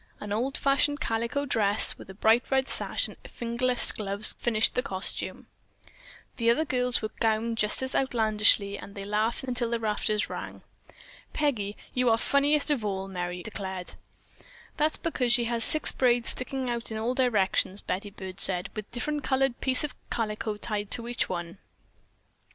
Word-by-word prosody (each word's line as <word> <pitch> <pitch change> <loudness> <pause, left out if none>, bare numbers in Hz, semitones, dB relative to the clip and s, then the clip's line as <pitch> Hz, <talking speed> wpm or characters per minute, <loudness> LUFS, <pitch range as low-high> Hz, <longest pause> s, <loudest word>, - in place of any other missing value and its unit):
An 210 -1 -5
old 250 +5 -1
fashioned 285 +1 +2
calico 235 +2 -1
dress 215 -5 +3
with - - -13
a 190 - -10
bright 225 +4 +3
red 265 0 +1
sash - - 0
and - - -12
fingerless 240 +1 -1
gloves 205 0 +1
finished 225 -2 +2
the 250 - +1
costume. 195 -7 -3 0.9
The 230 -1 +2
other 305 +7 +2
girls 250 -4 +1
were 215 - -3
gowned 225 0 0
just 210 +4 +3
as 260 - -1
outlandishly, 215 -5 +3
and 200 - -11
they 200 -1 -6
laughed 215 +5 0
until 245 -2 0
the 235 0 -1
rafters 215 -1 0
rang. - - -7 0.7
"Peggy, 225 -9 -1 0.2
you 250 -1 +2
are 225 - +4
funniest 285 +4 +3
of 265 -7 0
all," 195 -2 -3
Merry 180 -1 -5
declared. 190 -4 -5 0.8
"That's 305 0 +1
because 250 -7 0
she 240 - +4
has 235 0 -1
six 310 +5 +5
braids 245 -2 +3
sticking 260 0 -2
out 235 -1 -3
in 220 - -3
all 230 +3 -1
directions," 210 -6 +1
Betty 195 +3 -3
Byrd 190 -2 -9
said, 185 0 +3
"with 215 -1 -5
a - - -38
different 290 +4 -3
colored 265 -1 0
piece 260 +1 +1
of 300 - -3 0.2
calico 215 -1 -2
tied 210 -1 -3
to 235 -1 0
each 240 0 -2
one." 175 0 -5
230 Hz, 170 wpm, -27 LUFS, 205-255 Hz, 0.9 s, six